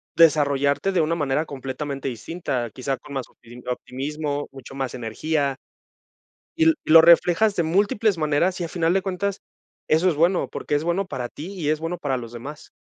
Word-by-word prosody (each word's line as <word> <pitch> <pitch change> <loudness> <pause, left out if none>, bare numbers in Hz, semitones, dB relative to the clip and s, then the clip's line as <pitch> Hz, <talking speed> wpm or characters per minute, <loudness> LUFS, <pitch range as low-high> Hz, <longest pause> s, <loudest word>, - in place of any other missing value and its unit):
desarrollarte 145 +1 +3
de 180 - +3
una 160 +2 +1
manera 145 -1 0
completamente 140 0 -5
distinta, 125 - -3
quizá 135 +1 -2
con 140 - -12
más 135 -3 -3
opti 120 +2 -15
optimismo, 145 +4 -3
mucho 135 -1 -11
más 135 -2 -3
energía 140 +4 -1 1.0
y 325 - +5
l 325 0 +5
y - - -3
lo 165 0 +10
reflejas 175 +5 +5
de 170 - +2
múltiples 200 +4 +2
maneras, 155 +5 +1
y - - -1
a - - -4
final 170 0 +1
de 195 - +2
cuentas 195 +1 -3 0.5
eso 160 +4 +3
es 165 - +1
bueno, 175 +4 +2
porque - - -3
es 145 - +1
bueno 175 +3 0
para 125 -8 -4
ti 165 +10 -8
y 165 -6 -3
es 155 - +1
bueno 165 +2 -3
para 140 -5 -1
los 120 -2 -7
demás. 140 +6 -9
155 Hz, 190 wpm, -23 LUFS, 135-175 Hz, 1.0 s, lo